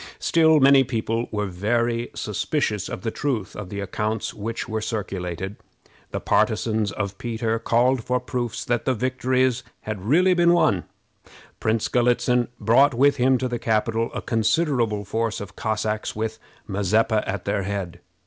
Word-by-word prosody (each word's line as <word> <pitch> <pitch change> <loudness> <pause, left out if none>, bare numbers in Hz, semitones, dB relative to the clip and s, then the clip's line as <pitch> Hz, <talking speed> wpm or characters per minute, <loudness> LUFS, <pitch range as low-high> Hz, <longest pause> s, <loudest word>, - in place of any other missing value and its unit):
Still 160 -2 +4
many 135 0 +6
people 115 -1 -2
were 105 -1 -2
very 115 +5 -1
suspicious 105 - -1
of - - -5
the 115 - -2
truth 125 -9 -2
of 100 -3 -7
the 100 - -5
accounts 105 +2 -2
which 115 +4 -4
were 110 -1 -2
circulated. 95 -3 -4 0.5
The - - -3
partisans 110 -3 +1
of 100 -1 -4
Peter 115 -1 -1
called 120 +2 +2
for 125 +2 0
proofs 120 -2 -4
that 120 -1 -1
the 130 - +1
victories 130 +1 +1 0.2
had 105 -3 -5
really 180 +8 +4
been 175 -1 +4
won. 100 - +2 0.7
Prince 110 0 0
Galitzin 125 0 +2
brought 120 +6 +4
with 140 +3 +4
him 130 +1 +3
to 130 - -1
the 120 -1 -3
capital 115 0 0
a - - -4
considerable 115 -2 +1
force 115 +2 -1
of 100 - -8
Cossacks, 110 -1 -2
with 110 +1 -3 0.3
Mazeppa 105 +2 +1
at 95 -1 -3
their 100 0 0
head. 95 -3 -4
115 Hz, 155 wpm, -23 LUFS, 105-125 Hz, 0.7 s, many